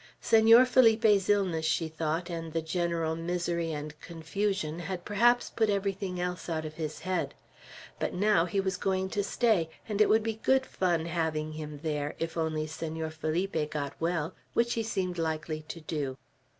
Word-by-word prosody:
Senor 225 +3 +7
Felipe's 220 -5 +4
illness, 190 -6 +2
she 160 +1 +1
thought, 160 +2 -2
and 165 -2 -5
the 165 - 0
general 165 -1 -1
misery 170 0 -1
and 150 0 -6
confusion, 170 0 -2
had 175 0 -5
perhaps 240 +4 +3
put 220 -2 +1
everything 195 -2 -1
else 180 0 -3
out 160 -1 -2
of 155 - -6
his 155 -1 -5
head; 185 -2 -2 0.6
but - - -1
now 200 -3 +3
he 185 +3 -1
was 190 -1 -1
going 190 -1 0
to 205 - 0
stay, 205 -6 +2 0.2
and 210 -1 0
it 215 - +5
would 220 0 +4
be 220 -1 -3
good 265 0 +3
fun 175 -7 0
having 160 -2 -1
him 150 -1 -7
there, 150 -2 -2
if 165 0 -3
only 160 -2 -1
Senor 160 0 -4
Felipe 155 0 -1
got 145 -2 -3
well, 165 0 -1 0.2
which 235 0 +2
he 230 - 0
seemed 185 -5 -2
likely 155 -1 -2
to 170 - -6
do. 145 -4 -3
170 Hz, 175 wpm, -29 LUFS, 160-200 Hz, 0.6 s, Senor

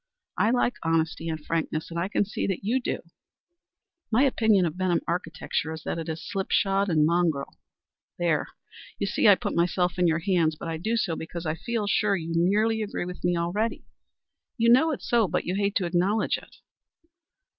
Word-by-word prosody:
I 215 - +2
like 245 0 +1
honesty 165 0 0
and 160 -1 -3
frankness, 160 0 -2
and 170 - -3
I 175 - 0
can 205 - +1
see 205 - -3
that 195 -2 -2
you 245 +6 +1
do. - - -3 1.1
My 235 +5 +4
opinion 220 -8 +3
of 160 -1 -2
Benham 180 -2 +1
architecture 165 -2 -2
is 160 0 -8
that - - -3
it 165 0 -5
is 160 0 -5
slip 195 -3 -3
shod 195 0 +2
and 155 -3 +3
mongrel. 165 -4 0 0.6
There! 165 -4 +1 0.5
You - - -1
see - - +2
I - - +9
put - - -4
myself 180 +1 +1
in 180 - +4
your 160 -1 +2
hands, 170 -3 +1
but 165 - -6
I 165 - -3
do 220 +8 -1
so 175 -7 0
because 170 +1 -6
I 155 - 0
feel 225 +5 -3
sure 205 0 +2
you 165 -2 -4
nearly 210 +6 +2
agree 205 -4 -3
with 180 0 -8
me 175 0 +1
already. 190 +7 -1 0.7
You 230 0 +4
know 265 +7 +5
it's 300 - -4
so, 235 -4 +3
but 180 - -1
you 180 - -1
hate 200 +1 0
to 185 - +1
acknowledge 185 +5 +1
it." - - -18
180 Hz, 200 wpm, -26 LUFS, 165-210 Hz, 1.1 s, I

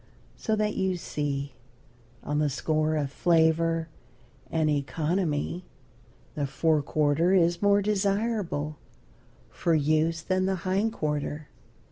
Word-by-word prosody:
So 220 - -1
that, 210 0 0
you 190 -1 0
see, 145 -4 -3 0.7
on 150 0 -1
the 150 -1 +2
score 155 +3 0
of 145 -3 -1
flavor 165 0 +2 0.6
and 160 -1 +1
economy, 155 +3 -1 0.7
the 145 -2 -2
fore 155 +2 +1
quarter 155 +5 +2
is 170 -1 +3
more 205 0 +4
desirable 200 -6 -1 0.7
for 170 -2 +1
use 155 +2 +1
than 185 +1 0
the 190 - +1
hind 195 +4 +1
quarter. 150 -4 -3
160 Hz, 115 wpm, -27 LUFS, 150-185 Hz, 0.7 s, more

